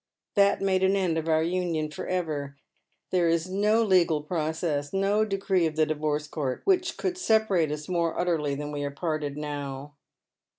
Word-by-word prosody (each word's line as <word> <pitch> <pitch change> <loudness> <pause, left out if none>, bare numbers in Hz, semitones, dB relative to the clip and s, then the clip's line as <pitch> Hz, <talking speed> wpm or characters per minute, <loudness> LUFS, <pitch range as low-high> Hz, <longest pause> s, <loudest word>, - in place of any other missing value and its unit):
That 200 -1 +3
made 190 -1 +2
an 190 +1 +3
end 180 -4 +1
of 160 - -6
our 160 0 +3
union 170 -3 -1
for - - -6
ever. 150 -6 -3 0.5
There 175 -2 +3
is 165 +1 +1
no 210 +4 +3
legal 170 -7 +3
process, 155 -2 -2
no 200 +2 +2
decree 195 -4 +1
of 155 - -5
the 155 0 +3
Divorce 150 -1 -1
Court, 140 -4 -3
which 365 -2 +1
could 365 -1 -2
separate 220 - +2
us 150 0 -5
more 170 -2 0
utterly 160 -5 0
than 145 +1 -5
we 145 -1 -3
are 145 - -1
parted 150 -1 -3
now." 145 -1 -5
165 Hz, 175 wpm, -27 LUFS, 150-190 Hz, 0.5 s, That